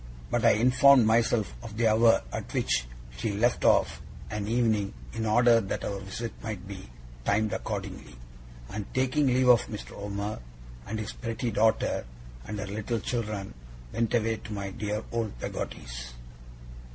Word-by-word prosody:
but 120 -2 +1
I 115 - +7
informed 130 +2 +6
myself 110 -3 +2
of 110 -2 -9
the 115 -1 +3
hour 115 - +5
at - - -5
which - - +1 0.3
she 100 - -1
left 120 +4 +1
of - - +3 0.3
an 105 -1 -3
evening, 110 -3 +1 0.2
in 110 -1 -2
order 115 +1 +5
that 95 - -3
our 100 -1 -3
visit 100 +4 -5
might 105 -3 -5
be 95 -9 -8 0.3
timed 110 - +1
accordingly; 100 - -5 0.6
and 105 -1 -5
taking 130 +3 +2
leave 130 0 +3
of 120 -1 +6
Mr. 105 - -7
Omer, 100 -1 -4 0.5
and 110 - -3
his 110 -2 -4
pretty 115 0 -3
daughter, 110 - +2 0.4
and 105 - -4
her 105 - -3
little 110 +3 -2
children, 105 - -3 0.4
went 115 +1 0
away 115 -1 +1
to 110 - -10
my 100 -2 -4
dear 105 +2 -3
old 115 - -2
Peggotty's. - - -6
110 Hz, 155 wpm, -28 LUFS, 100-115 Hz, 0.6 s, I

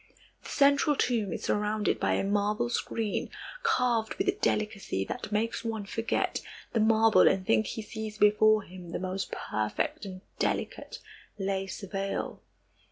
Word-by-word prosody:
The - - -10
central 285 +1 +4
tomb 225 -8 +1
is - - -4
surrounded 210 0 0
by - - +2
a - - +1
marble 210 +4 +1
screen 225 -3 -2 0.3
carved 250 - +1
with 385 - -1
a - - +6
delicacy 210 - -1
that - - -5
makes 225 +2 0
one 220 -3 -3
forget 225 +3 -1 0.3
the 230 - +2
marble 220 0 +5
and 190 -1 +2
think 110 -6 +3
he 220 - -4
sees 215 -1 -6
before 215 0 +5
him 180 -2 -10
the - - -2
most 185 +1 -3
perfect 105 0 -2
and 185 -1 -7 0.2
delicate - - -2 0.4
lace 195 -1 -2
veil. 195 0 -3
210 Hz, 150 wpm, -29 LUFS, 195-225 Hz, 0.4 s, a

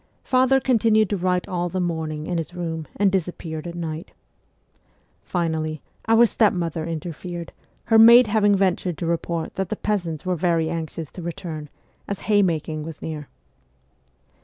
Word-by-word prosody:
Father 260 +1 +3
continued 220 -5 +3
to - - +2
write 180 0 0
all 175 -1 -2
the 185 - -2
morning 160 -3 -2
in 175 -1 -1
his 165 +2 -6
room, 160 -3 -4
and 200 -1 +3
disappeared 175 -3 -3
at 170 - -6
night. 165 +1 -5 1.1
Finally, 160 -3 -2 0.2
our 225 +1 +6
stepmother 175 -8 +1
inter 165 +1 -4
fered, 170 +1 -7 0.3
her 225 -1 +4
maid 235 +2 +9
having 205 -1 +3
ventured 185 -3 0
to - - -3
report 170 0 -2
that 190 -2 -1
the - - -1
peasants 180 -8 -2
were 185 0 0
very 165 -1 +1
anxious 165 -2 -5
to 180 - -9
return, 160 -3 -6 0.4
as 200 - -4
haymaking 170 -7 +1
was 155 0 -7
near. 150 -3 -6
175 Hz, 155 wpm, -23 LUFS, 160-200 Hz, 1.1 s, maid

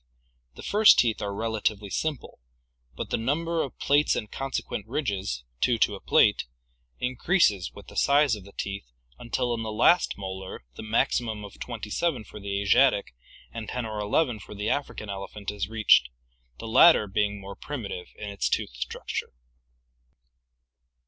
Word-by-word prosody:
The - - -10
first 210 +1 +6
teeth 115 -4 +2
are 100 - -2
relatively 105 -1 -2
simple, 155 -5 -3 0.6
but - - -6
the - - +2
num 145 +9 -1
ber 165 0 0
of 135 - -5
plates 145 +1 +3
and 105 - -4
consequent 135 0 -4
ridges, 95 - -2 0.2
two 120 - +2
to 105 - +2
a 100 - -6
plate, - - +4 0.5
increases 125 - +2
with - - -11
the - - -13
size 140 -3 +4
of 105 - -10
the 100 - -14
teeth 100 -9 -5 0.3
until 120 +1 -1
in 115 - -3
the 110 -1 -4
last 170 +11 +3
molar 95 -6 -7
the - - -9
maximum 110 0 0
of 100 - -13
twenty 115 -3 -6
seven 150 -7 0
for 105 - -11
the 100 0 -3
Asiatic 120 - +3 0.4
and 115 -2 -6
ten 125 -2 -3
or 110 -1 -4
eleven 110 +3 +1
for 105 - -11
the 105 +2 -2
African 140 -6 -3
elephant 100 +1 -5
is 100 -1 -4
reached, 110 - +4 0.5
the 115 - -7
latter 135 +2 +7
being 105 0 -1
more 100 0 -9
prim 145 -5 -6
itive 90 -3 -6
in 105 - -6
its 100 0 -1
tooth - - -1
structure. - - -5
110 Hz, 170 wpm, -27 LUFS, 100-125 Hz, 0.6 s, latter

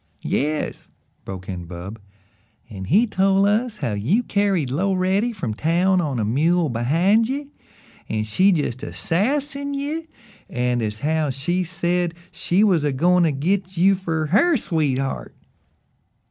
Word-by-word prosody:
"Yes," 150 +2 -2 0.4
broke 95 -1 -7
in 90 -2 -5
Bub, 90 +6 -8 0.7
"and 95 -2 -7
he 205 - +4
tol' 195 -2 +2
us 215 +2 +1
how 120 - -2
you 140 - +1
carried 195 - 0
Loretty 190 - +1
from 175 - -4
town 175 - +2
on 145 -6 -2
a 110 - 0
mule 160 +8 +2
behind 170 - +2
ye, 280 +1 -4 0.6
and 110 -1 -1
she 185 - +3
jest 145 -7 -1
a 145 - -6
sassin' 280 - -1
you, 305 +4 -3 0.4
an' 125 -1 0
as 110 0 -3
how 155 0 0
she 160 +8 -1
said 175 0 -1 0.2
she 185 +4 +1
was 180 -8 +3
a 145 - +1
goin' 175 +7 +3
to 165 -2 +3
git 180 +6 -1
you 190 +3 +5
fer 165 -4 -2
HER 290 - +3
sweetheart." 135 - -2
175 Hz, 145 wpm, -22 LUFS, 135-200 Hz, 0.7 s, you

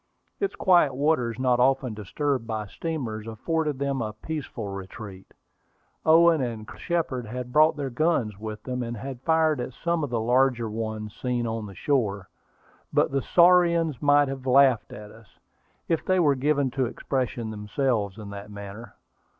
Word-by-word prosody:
Its 395 -1 -1
quiet 175 -8 +4
waters, 130 -5 +1
not 125 -1 +2
often 130 -1 +2
disturbed 115 +4 -2
by 110 -2 -3
steamers, 115 -4 -5
afforded 150 +6 -2
them 140 -1 -1
a 110 -1 -3
peaceful 120 -2 -6
retreat. 95 0 -8 0.8
Owen 165 -1 +6
and 115 -4 -4
Colonel - - -11
Shepard 150 -9 -2
had 125 +2 -6
brought 155 0 +5
their 140 -2 -3
guns 120 - 0
with 110 0 -6
them, 125 -1 -3
and 120 -1 -4
had 130 +3 -7
fired 160 -2 +2
at 125 +1 -5
some 170 +2 -1
of 145 - -2
the 120 -1 -1
larger 120 0 +2
ones 110 -1 -4
seen 125 -2 -2
on 110 -2 -3
the 100 - -11
shore; 105 -10 -1 0.6
but - - +2
the 135 0 0
saurians 170 -5 +4
might 145 0 +4
have 135 -1 -6
laughed 130 -3 +4
at 105 0 -9
them, 115 0 -16 0.6
if 165 -2 0
they 185 0 +2
were 150 -5 +4
given 140 0 +1
to 130 -1 0
expressing 120 -3 -3
themselves 105 -1 -1
in 105 -2 -8
that 100 +1 -8
manner. 100 +3 -9
125 Hz, 165 wpm, -26 LUFS, 110-145 Hz, 0.8 s, Owen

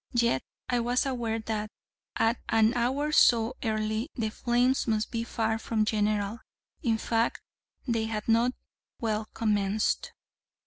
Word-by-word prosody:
Yet 235 - +3 0.3
I 245 - +1
was 245 +3 +1
aware 240 -4 -1
that, 215 -1 -3 0.5
at 225 +2 +2
an 225 +1 +4
hour 265 +5 0
so 235 -5 +5
early, 215 +3 -1
the 225 -4 -1
flames 245 +4 +1
must 215 -1 0
be 230 0 -1
far 225 -1 -1
from 220 -1 0
general; 210 0 0 0.4
in 225 -2 +1
fact, 230 +1 0 0.5
they 230 -2 +1
had 215 -1 -4
not 235 +2 +3 0.5
well 215 -1 -1
commenced. 210 -1 0
225 Hz, 135 wpm, -28 LUFS, 215-240 Hz, 0.5 s, so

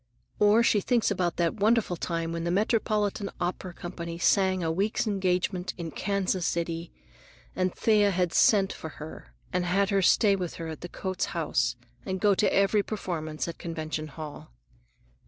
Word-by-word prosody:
Or 210 +3 +5
she 210 -3 +3
thinks 235 0 +2
about 180 -3 0
that 170 +3 0
wonderful 215 -3 +2
time 165 0 -3
when 165 0 -3
the 170 - -1
Metropolitan 210 0 +1
Opera 180 +1 -3
Company 170 -1 -6
sang 185 0 +2
a 160 - 0
week's 200 +8 0
engagement 185 -2 -1
in 165 -2 -5
Kansas 195 -1 -1
City, 170 0 -2 0.6
and 185 0 +1
Thea 210 -2 +3 0.2
sent 195 0 +4
for 160 - -7
her 155 +1 -10 0.2
and 180 0 +1
had 195 +3 +1
her 195 -1 +3
stay 200 +3 +4
with 180 -3 -4
her 165 - -6
at 160 - -7
the 175 - -6
Coates 185 0 -2
House 125 -7 +1 0.3
and 190 +5 -3
go 205 +2 +4
to 200 - +2
every 200 +2 +3
performance 160 -9 -4
at 170 - -7
Convention 155 -2 -4
Hall. 150 - -9
185 Hz, 165 wpm, -28 LUFS, 170-200 Hz, 0.6 s, Or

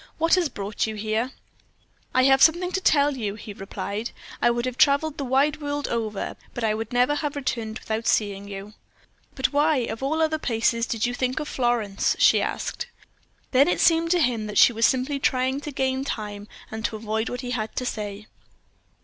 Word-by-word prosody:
What 330 +1 +2
has 360 -5 +4
brought 205 0 -3
you 220 - -4
here?" 220 +4 -1 0.8
"I 255 - +3
have 270 0 +5
something 350 +3 +5
to 380 - -1
tell 290 -4 +3
you," 210 -5 -3
he 210 -1 -9
replied. 200 +3 -5 0.3
"I - - +5
would 240 +1 0
have 255 -1 -3
traveled 285 +3 +3
the - - -1
wide 280 +4 +1
world 290 0 -2
over, 220 -3 -3 0.2
but 240 - -4
I 215 -1 +2
would 220 0 -4
never 250 +3 +3
have 295 -1 -2
returned 230 -5 -3
without 220 +1 -3
seeing 200 -2 0
you." 200 +1 -8 0.6
"But 265 - 0
why, 300 +2 +3
of 230 -2 -3
all 295 +4 0
other 315 0 0
places, 230 -2 0
did 225 -2 -1
you 245 - -1
think 255 +2 -1
of 300 - -4
Florence?" 240 -7 0
she - - +5
asked. - - -3 0.6
Then 270 +2 +5
it 355 - +1
seemed 330 0 +4
to 355 +1 +3
him 235 -6 0
that 210 - -4
she 240 - +7
was 225 +1 +4
simply 265 +2 0
trying 260 +1 +1
to 295 - -6
gain 265 -1 -1
time, 210 -5 -5 0.2
and 220 0 -5
to - - -1
avoid 220 +1 -2
what 245 0 -4
he 250 -1 -5
had 220 -3 -3
to 255 - -2
say. 210 -3 -4
245 Hz, 200 wpm, -25 LUFS, 220-285 Hz, 0.8 s, she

